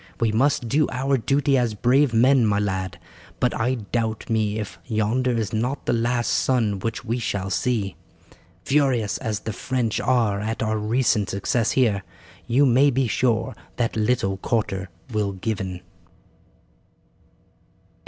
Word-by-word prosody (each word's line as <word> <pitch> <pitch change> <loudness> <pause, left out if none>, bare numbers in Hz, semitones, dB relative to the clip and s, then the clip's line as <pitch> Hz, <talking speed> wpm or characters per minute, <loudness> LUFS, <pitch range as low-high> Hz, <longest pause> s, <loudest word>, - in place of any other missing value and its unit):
We 115 -2 +2
must 125 +2 +1
do 145 +5 +2
our 135 +2 0
duty 135 +3 +2
as 120 -3 0
brave 130 +5 +3
men, 125 +3 +4
my 100 -1 +2
lad, 95 -3 -2 0.4
but - - +1
I 125 +4 0
doubt 110 0 -3
me 110 -1 +1
if 95 -6 -6
yonder 115 +4 0
is 110 -2 -2
not 125 +6 -2
the - - +1
last 120 +1 0
sun 110 -6 +1
which 115 +4 -4
we 120 +2 -1
shall 100 -4 -3
see. 100 0 -1 0.7
Furious 135 -7 +1
as 110 -3 -3
the 110 - -4
French 120 0 -1
are 115 -6 +1
at 110 +2 -2
our 110 0 0
recent 110 -1 +1
success 105 +4 0
here 110 -7 +2 0.5
you 135 +5 +4
may 135 +3 +5
be 130 -1 +1
sure 115 0 0 0.2
that 120 -2 -1
little 105 -3 +1
quarter 95 -3 -2 0.2
will 105 -2 -1
given." 95 -2 -4
115 Hz, 145 wpm, -23 LUFS, 105-125 Hz, 0.7 s, may